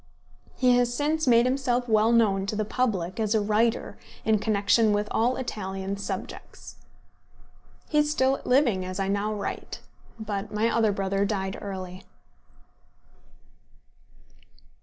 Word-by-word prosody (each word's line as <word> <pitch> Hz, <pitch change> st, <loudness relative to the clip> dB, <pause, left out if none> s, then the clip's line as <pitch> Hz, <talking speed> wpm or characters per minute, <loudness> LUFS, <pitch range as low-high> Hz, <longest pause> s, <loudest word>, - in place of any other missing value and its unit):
He 250 Hz, -1 st, +4 dB
has 245 Hz, -1 st, +2 dB
since 300 Hz, +4 st, -1 dB
made 235 Hz, -1 st, +5 dB
himself 255 Hz, -1 st, 0 dB
well 220 Hz, 0 st, +3 dB
known 200 Hz, -4 st, +2 dB
to 210 Hz, -, -2 dB
the 215 Hz, 0 st, -1 dB
public 210 Hz, -5 st, -1 dB
as 215 Hz, 0 st, +1 dB
a -, -, +4 dB
writer 220 Hz, +3 st, 0 dB, 0.3 s
in 220 Hz, -1 st, +3 dB
connection 210 Hz, +1 st, +2 dB
with 205 Hz, 0 st, 0 dB
all 240 Hz, +3 st, +1 dB
Italian 195 Hz, -5 st, -4 dB
subjects. 200 Hz, -, -7 dB, 1.1 s
He 300 Hz, -, +2 dB
is 295 Hz, 0 st, +2 dB
still 270 Hz, -2 st, +1 dB
living 250 Hz, -8 st, +2 dB
as 185 Hz, +1 st, -5 dB
I 195 Hz, -, 0 dB
now 200 Hz, +2 st, 0 dB
write. 205 Hz, -2 st, -5 dB, 0.4 s
But 205 Hz, -1 st, -4 dB
my 220 Hz, +2 st, 0 dB
other 225 Hz, -2 st, +3 dB
brother 195 Hz, 0 st, -1 dB
died 195 Hz, -2 st, -2 dB
early. 185 Hz, -2 st, -7 dB
215 Hz, 135 wpm, -26 LUFS, 200-240 Hz, 1.1 s, made